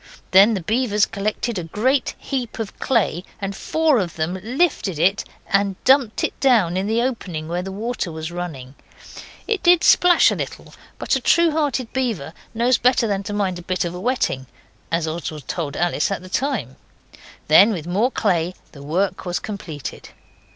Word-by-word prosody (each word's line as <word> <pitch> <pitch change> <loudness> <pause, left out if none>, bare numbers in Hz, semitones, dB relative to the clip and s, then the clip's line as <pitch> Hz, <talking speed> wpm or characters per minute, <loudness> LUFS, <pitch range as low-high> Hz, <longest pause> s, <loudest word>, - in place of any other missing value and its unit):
Then 200 +4 +6
the 185 - -4
beavers 215 +1 +2
collected 210 +1 -3
a - - -4
great 250 - 0
heap 255 -4 -4
of 225 -3 -6
clay, 210 -8 +1 0.2
and 195 -1 -4
four 315 -1 +2
of 175 -4 -3
them 165 +4 -2
lifted 245 - 0
it 185 +5 +2 0.2
and 195 -1 +1
dumped 260 -4 +3
it - - 0
down 220 -11 +3
in 190 +2 -1
the 225 +2 +1
opening 180 -11 -3
where 175 +2 -2
the 190 +1 -6
water 215 -2 -3
was 160 +1 -6
running. 155 -8 -6 0.7
It 435 -4 0
did 350 0 +5
splash 355 -1 +6
a - - -1
little, - - -6 0.2
but - - 0
a - - +1
true 340 -1 +4
hearted 285 -6 -1
beaver 220 - -2 0.2
knows 240 +2 +2
better 245 -1 +3
than 200 -3 -1
to 205 +1 -6
mind 190 -3 -1
a - - -8
bit 185 +1 -2
of 170 - -4
a 180 - -6
wetting, 185 - -1 0.4
as 165 -1 0
Oswald 155 -3 -5
told 155 -5 -3
Alice 175 0 +1
at 195 -2 -3
the 185 - -11
time. 225 - -2 0.7
Then 190 +8 +7
with 170 -7 -4
more 200 +8 +1
clay 180 -7 0 0.2
the 140 - -13
work 180 +6 -1
was 175 -1 -2
completed. 170 -9 -7
200 Hz, 180 wpm, -21 LUFS, 175-245 Hz, 0.7 s, Then